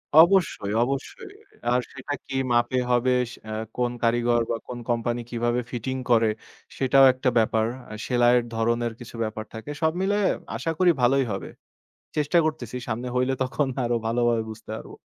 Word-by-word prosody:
অবশ্যই, 165 - +5
অবশ্যই। 375 - -5 0.4
আর 125 - +4
সেটা 135 +2 -5
কি 135 - -6 0.2
মাপে 120 +2 +2
হবে, 125 +1 +3 0.4
এ - - -4 0.3
কোন 125 -1 +1
কারিগর 120 0 +3
বা 115 - 0
কোন 120 -1 -6
কোম্পানি 120 0 0
কিভাবে 120 0 0
ফিটিং 130 +2 -3 0.2
করে 115 -1 +5 0.5
সেটাও 135 0 +5
একটা 130 0 0
ব্যাপার। 110 0 +3 0.4
সেলাইয়ের 120 -1 +4
ধরনের 115 +1 0
কিছু 120 0 -10
ব্যাপার 110 0 -4
থাকে। 110 +6 -7
সব 160 - +3
মিলায় 200 0 +2 0.3
আশা 165 - -2
করি 180 -1 +6
ভালোই 135 +2 +4
হবে। 95 - -4 0.7
চেষ্টা 150 +3 +2
করতেসি। 140 -7 -3
সামনে 120 +2 -3
হইলে 130 +1 +2
তখন 135 +3 0 0.2
আরো 120 0 +1
ভালোভাবে 120 -1 +2
বুঝতে 110 0 -10
পারব। - - -10
120 Hz, 155 wpm, -25 LUFS, 115-135 Hz, 0.7 s, করি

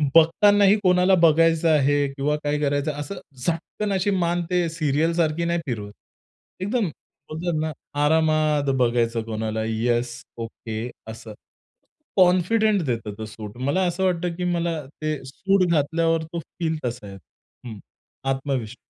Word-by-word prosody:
बघतानाही 200 +5 +6
कोणाला 180 +1 +4
बघायचं 165 0 +4
आहे 145 -1 +3
किंवा 145 +2 0
काय 145 0 0
करायचं 145 +1 0
असं 145 +7 -5 0.2
झटकन 170 +8 -3
अशी 190 +1 +1
मान 175 +1 0
ते 180 -1 +1
सीरियलसारखी 160 +1 0
नाही 170 0 0
फिरवत. 105 -6 -4 0.7
एकदम 205 +2 0 0.4
बोलतात 160 0 -2
ना, 155 0 -1 0.3
आरामात 155 -2 +2
बघायचं 120 -2 +1
कोणाला, 110 0 -3
"येस, 120 +2 0 0.2
ओके" 115 0 -5 0.2
असं. 110 0 -9 0.8
कॉन्फिडेंट 190 +3 +4
देत 115 -4 -2
तो 110 - -5
सूट. 105 0 -9
मला 140 +9 0
असं 175 +2 -2
वाटतं 180 -2 0
की 180 - -4
मला 170 -1 -1 0.2
ते 155 0 -1
सूट 190 +8 +1
घातल्यावर 165 +1 +1
तो 160 +2 -6
फील 160 0 -4
तसा 120 -3 -4
येतो. 95 +6 -17
हं 110 -3 -8 0.5
आत्मविश्वास. 135 -4 -2
155 Hz, 135 wpm, -23 LUFS, 125-170 Hz, 0.8 s, बघतानाही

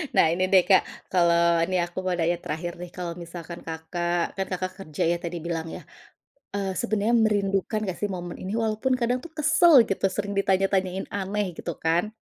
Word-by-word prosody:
Nah, - - +6
ini 185 +2 0
deh 190 -2 +7
Kak, 190 -2 +7 0.3
kalau 170 -1 +4
nih, 185 -1 +1
aku 175 - -16
mau 185 - +1
nanya 170 +1 +1
terakhir, 170 +3 -4
nih. 180 - -6
Kalau 175 -1 -5
misalkan 170 0 -8
Kakak 175 +1 -2
kan 195 - 0
Kakak 185 0 -2
kerja 155 -6 -3
ya, 175 - +1
tadi 175 0 -4
bilang 165 -1 -2
ya, - - -8 0.7
eee, 195 -1 -1
sebenarnya 220 0 +1
merindukan 200 0 +1
nggak 185 -3 -4
sih 205 - 0
momen 175 -2 -5
ini? 190 - -4
Walaupun 225 +3 0
kadang 245 +1 +1
tuh 340 - -9
kesel 315 +3 +5
gitu, 195 - -2
sering 200 +1 -3
ditanya 195 -1 +3
tanyain 190 0 0
aneh, 200 -2 -2
gitu 170 - -4
kan? 175 +6 0
185 Hz, 190 wpm, -25 LUFS, 170-200 Hz, 0.7 s, deh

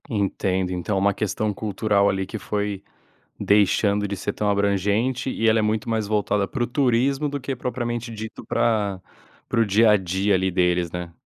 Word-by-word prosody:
Entendo. 95 -4 -1
Então 90 +3 -2
é - - +2
uma 100 +1 +2
questão 105 +1 -2
cultural 100 0 +1
ali 95 -1 -1
que 110 - -6
foi 100 -1 -3 0.6
deixando 105 0 +2
de 100 - -3
ser - - -3
tão 105 - -1
abrangente, 100 +6 +1
e 115 -3 +1
ela 110 - +3
é - - +2
muito 110 +1 -1
mais 110 -2 0
voltada 105 -1 0
para 120 - -2
o - - -1
turismo 135 +2 +1
do 145 0 -3
que 135 0 -4
propriamente 120 -1 -3
dito 110 0 -8
para 105 -5 0 0.5
para - - 0
o 115 - +4
dia 105 +2 +4
a 105 - +5
dia 95 +2 0
ali 95 0 +1
deles, 90 -1 +1
né. 90 -1 -6
105 Hz, 190 wpm, -23 LUFS, 95-115 Hz, 0.6 s, a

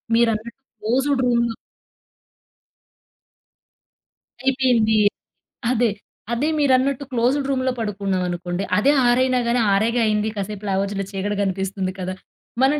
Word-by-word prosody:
మీరన్నట్టు 230 +1 0 0.2
క్లోజ్డ్ 260 +5 +1
రూమ్‌లో 235 -2 +1 2.9
అయిపోయింది. 250 -5 +3 0.7
అదే, 240 -1 +2 0.4
అదే. 255 +6 0
మీరన్నట్టు 275 -1 +2
క్లోజ్డ్ 255 +3 +1
రూమ్‌లో 260 -1 +1
పడుకున్నాం 200 -3 -1
అనుకోండి. 175 +1 -3
అదే 265 +7 +4 0.2
6 240 +1 +4
అయినా 255 -1 +2
గానీ, 240 +1 +2
"ఆరేగా 230 +4 +2
అయింది, 210 0 +1
కాసేపు" 205 0 -5
అని - - -2
లేవచ్చులే 195 +1 -1
చీకటి 205 +1 -2
కనిపిస్తుంది 190 0 -2
కదా. 185 0 -3 0.5
మనం 280 +3 +3
230 Hz, 115 wpm, -22 LUFS, 200-255 Hz, 2.9 s, అదే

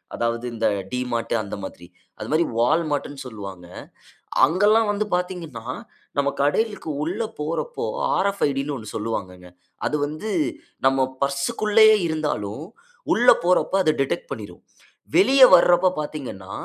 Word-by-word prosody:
அதாவது 115 +1 -2
இந்த 115 -1 0 0.2
டிமார்ட் 125 -2 -2
அந்த 100 - -6
மாதிரி. 85 -2 -9 0.3
அது - - -6
மாரி 160 +2 +3
Wallmartன்னு 145 +1 0
சொல்லுவாங்க. 100 -6 -8 0.8
அங்கெல்லாம் 205 +7 +3
வந்து 210 +1 -1
பாத்தீங்கன்னா 175 -10 -4 0.5
நம்ம 140 0 +2
கடைக்கு 205 +4 0
உள்ள 185 +8 -3 0.2
போறப்போ, 155 -4 -3 0.3
ஆர்எஃப் 200 +1 0
ஐடின்னு 140 +1 -2
ஒண்ணு 110 -2 -10
சொல்லுவாங்கங்க. 95 -5 -5 0.4
அது 150 - 0
வந்து, 155 +9 -6 0.6
நம்ம 135 0 +3 0.2
பர்ஸ்க்குள்ளயே 210 +11 +4
இருந்தாலும் 150 -6 -3 0.5
உள்ள 245 +1 +4
போறப்ப 180 +1 +2
அது 155 - +4
டிடெக்ட் - - -2
பண்ணிரும். - - -8 0.5
வெளிய 275 -8 +5
வரப்ப 175 +1 +4
பாத்தீங்கன்னா, 125 -11 -7
150 Hz, 120 wpm, -23 LUFS, 115-185 Hz, 0.8 s, வெளிய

